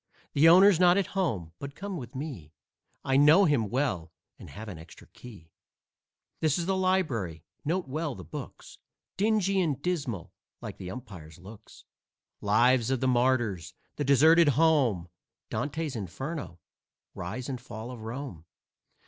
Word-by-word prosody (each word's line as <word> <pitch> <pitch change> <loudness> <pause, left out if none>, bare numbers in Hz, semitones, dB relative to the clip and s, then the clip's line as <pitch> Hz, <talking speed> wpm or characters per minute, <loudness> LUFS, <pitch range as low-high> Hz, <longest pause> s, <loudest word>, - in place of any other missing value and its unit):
The 155 +3 +6
owner's 185 +1 +7
not 180 0 +5
at 200 -1 -1
home, 115 - -1
but 140 0 -7
come 200 -1 -6
with 125 -7 -8
me; 130 - -7 0.5
I 135 0 +2
know 155 +8 +6
him 130 - +1
well 110 - -1 0.3
and - - -11
have 110 +2 -9
an 90 -6 -8
extra 80 +1 -14
key. 100 -10 -14 0.9
This 155 -3 +1
is 170 - -2
the 190 +1 0
library; 145 - 0 0.2
note 175 +3 -1
well 150 +1 -3
the 95 - -9
books, - - -9 0.4
Dingy 195 -2 +2
and 150 -7 -1
dismal, 140 - -3 0.3
like - - -8
the 90 - -6
umpire's 90 -9 -10
looks. 105 +4 -14 0.6
"Lives 120 +3 +3
of 130 -1 0
the 130 - 0
Martyrs," 120 -7 +1 0.2
"The 145 - -1
Deserted 155 +4 +5
Home," 135 - +3 0.4
"Dante's 150 -1 -3
Inferno," 115 - -5 0.6
"Rise 110 +9 -5
and 130 -3 -5
Fall 115 0 -8
of 120 -3 -9
Rome." 115 - -7
130 Hz, 150 wpm, -28 LUFS, 105-160 Hz, 0.9 s, owner's